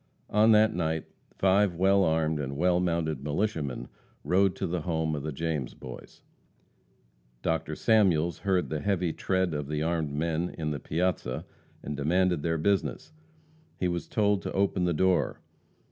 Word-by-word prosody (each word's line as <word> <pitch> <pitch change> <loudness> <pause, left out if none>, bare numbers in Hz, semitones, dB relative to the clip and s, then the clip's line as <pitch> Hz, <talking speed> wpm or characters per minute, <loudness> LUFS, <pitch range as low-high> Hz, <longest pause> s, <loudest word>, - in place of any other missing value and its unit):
On 110 +2 +5
that 110 +1 +5
night, 80 -2 -1 0.3
five 95 -1 +3
well 95 +2 +4
armed 80 -2 +1
and 70 -1 -4
well 90 +2 +3
mounted 85 -5 -1
militiamen 75 - -2 0.4
rode 95 +1 +2
to - - -3
the 85 0 -2
home 80 -1 -1
of 75 - -3
the 75 +2 -4
James 75 -3 -3
Boys. 65 -1 -11 1.2
Dr. 80 -1 -1
Samuels 90 -7 +3
heard 95 -5 0
the 75 - -1
heavy 90 -5 0
tread 95 -3 0
of 75 -2 -3
the 75 +1 -2
armed 80 -3 -1
men 85 +3 -1
on 75 -2 -2
the 70 - -3
piazza, 80 -5 -2 0.4
and 75 - -4
demanded 90 +3 +1
their 80 +1 0
business. 100 - -1 0.6
He 90 - 0
was 85 -1 -3
told 105 -2 +1
to - - -4
open 95 -2 +1
the 85 - +1
door. 95 +3 +1
85 Hz, 160 wpm, -28 LUFS, 75-95 Hz, 1.2 s, On